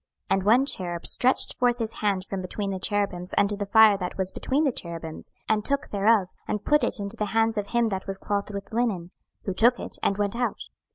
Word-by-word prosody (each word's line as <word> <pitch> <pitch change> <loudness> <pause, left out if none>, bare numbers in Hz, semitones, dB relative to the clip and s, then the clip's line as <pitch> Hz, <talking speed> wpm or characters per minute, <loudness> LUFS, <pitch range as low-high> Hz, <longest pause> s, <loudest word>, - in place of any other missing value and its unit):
26:010:007 - - +4
And 190 - -3
one 245 +5 +5
cherub 175 -9 -2
stretched 255 +1 +2
forth 245 -1 +3
his 225 -2 -3
hand 195 -3 0
from 195 -1 -4
between 195 +2 -4
the 190 - -3
cherubims 195 -3 -1
unto 205 +1 +3
the 200 0 -4
fire 215 -1 +6
that 180 -1 -4
was 190 -1 -2
between 280 +4 0
the 280 - +2
cherubims, 165 -6 -7 0.2
and 215 -1 +1
took 280 +4 0
thereof, 205 -1 +3 0.2
and 210 - -3
put 295 0 +3
it - - 0
into 200 +2 -3
the 210 - 0
hands 225 0 +3
of 205 -1 -2
him 235 0 +1
that 190 -1 -4
was 195 0 -3
clothed 200 +1 -2
with 200 +2 -7
linen: 205 -7 -1 0.3
who 195 - -2
took 235 +6 +4
it, - - -6
and 200 - +1
went 205 +1 0
out. 245 0 -2
205 Hz, 230 wpm, -26 LUFS, 190-230 Hz, 0.3 s, fire